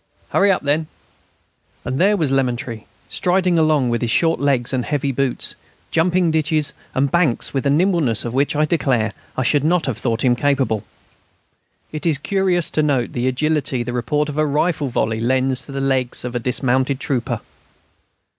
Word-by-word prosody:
"Hurry 200 0 +3
up, 185 - 0
then." 150 +2 0 1.0
And 130 +2 -2
there 200 +3 +4
was 155 -7 0
Lemaître, 125 -3 -1 0.2
striding 180 -1 +1
along 155 -5 +2
with 120 0 -1
his 120 - -1
short 165 +7 +2
legs 135 -3 +1
and 125 -2 0
heavy 140 0 -1
boots, 135 -1 -1 0.4
jumping 170 +1 +2
ditches 155 -1 0 0.2
and 135 +1 +1
banks 165 -9 +1
with 135 0 0
a - - +3
nimbleness 155 - +2
of 120 - -4
which 140 +3 +1
I 150 +1 +3
declare 125 -9 0 0.2
I 130 - +1
should 145 +3 +2
not 170 +2 +2
have 120 -4 -3
thought 120 -1 -1
him 125 -1 +4
capable. 130 -6 0 1.1
It 155 +2 -3
is 155 -4 +2
curious 185 +2 0
to 155 - +1
note 140 -5 0
the 125 +1 -1
agility 135 -1 0
the 120 0 -5
report 150 +5 0
of 150 0 -4
a 155 - +3
rifle 150 0 0
volley 110 -2 -1
lends 130 +2 +1
to - - -9
the 135 - -4
legs 130 -3 0
of 125 - -4
a - - +1
dismounted 130 +2 0
trooper. 130 -4 -2
140 Hz, 180 wpm, -20 LUFS, 125-155 Hz, 1.1 s, there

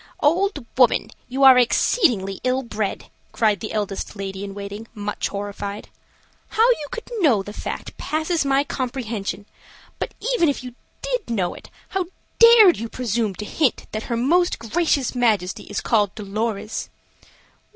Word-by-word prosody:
"Old 345 - +2
woman, 240 -3 +4 0.2
you 265 +2 0
are 260 -2 +9
exceedingly 235 - +2
ill 255 +1 +1
bred," 215 -4 -4 0.2
cried 215 -4 +2
the 215 - -5
eldest 205 -2 -3
lady 195 -1 -5
in 200 -1 -7
waiting, 205 +2 -7
much 205 0 -3
horrified. 200 0 -5 0.6
"How 450 +2 +3
you 305 -12 -1
could 460 - -7
know 255 - +3
the 205 - -8
fact - - -6
passes 315 +1 0
my 275 0 +2
comprehension. 235 -7 -4 0.5
But - - -4 0.2
even 345 -10 +3
if 280 - -2
you 250 -1 -8 0.3
did - - -2
know 190 -7 0
it, - - -13 0.2
how 380 -2 -1 0.3
dared 460 -6 +8
you 230 +1 -5
presume 225 -5 -1
to 210 - -6
hint 280 +2 0
that 215 - -3
her 235 - 0
most 345 +9 +2
gracious 270 +3 0
Majesty 215 -7 0
is 205 - -4
called 205 -4 +1
Dolorez?" 215 +1 -3
230 Hz, 150 wpm, -22 LUFS, 205-290 Hz, 0.6 s, are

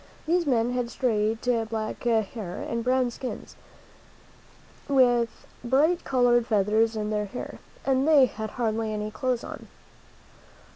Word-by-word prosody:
These 340 0 +1
men 240 -2 +2
had 245 -1 -2
straight 225 -2 -1 0.2
black 220 -1 -4
hair 220 -5 -1
and 230 0 -2
brown 255 0 +2
skins, 255 +2 -7 1.3
with 245 -4 +2 0.2
bright 295 +8 +2
colored 245 -2 +3
feathers 220 +2 +2
in 210 0 -2
their 210 -1 0
hair, 235 +5 -7 0.3
and 270 +1 +2
they 295 -4 +7
had 220 -3 -5
hardly 225 -2 -1
any 210 0 -3
clothes 255 -1 -1
on. - - -8
235 Hz, 130 wpm, -26 LUFS, 220-255 Hz, 1.3 s, they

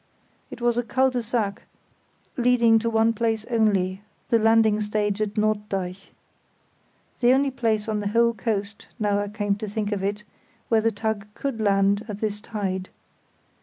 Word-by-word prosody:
It - - -10
was 240 0 +2
a - - 0
cul 260 +2 +2
de 250 -1 -1
sac 225 -3 -2 0.7
leading 240 -3 +4
to 230 +1 -1
one 225 0 +3
place 225 -1 -1
only, 195 -4 +1 0.3
the 230 -2 +4
landing 220 -1 +4
stage 210 0 -1
at 210 -1 -2
Norddeich. 205 -3 -2 1.1
The 245 0 +4
only 275 +1 +2
place 225 -4 0
on 215 -1 -1
the 205 - -2
whole 235 +2 +3
coast, 210 -1 -3
now 205 -3 +1
I 205 - -2
came 205 -1 -1
to 215 - -5
think 210 0 -3
of 200 -2 -1
it, 205 +1 -2 0.5
where 225 -1 +4
the 225 - +2
tug 215 -1 -3
could 275 -5 -3
land 200 0 +2
at 210 -2 -6
this 210 -1 -2
tide. 190 -4 -4
215 Hz, 165 wpm, -24 LUFS, 205-230 Hz, 1.1 s, leading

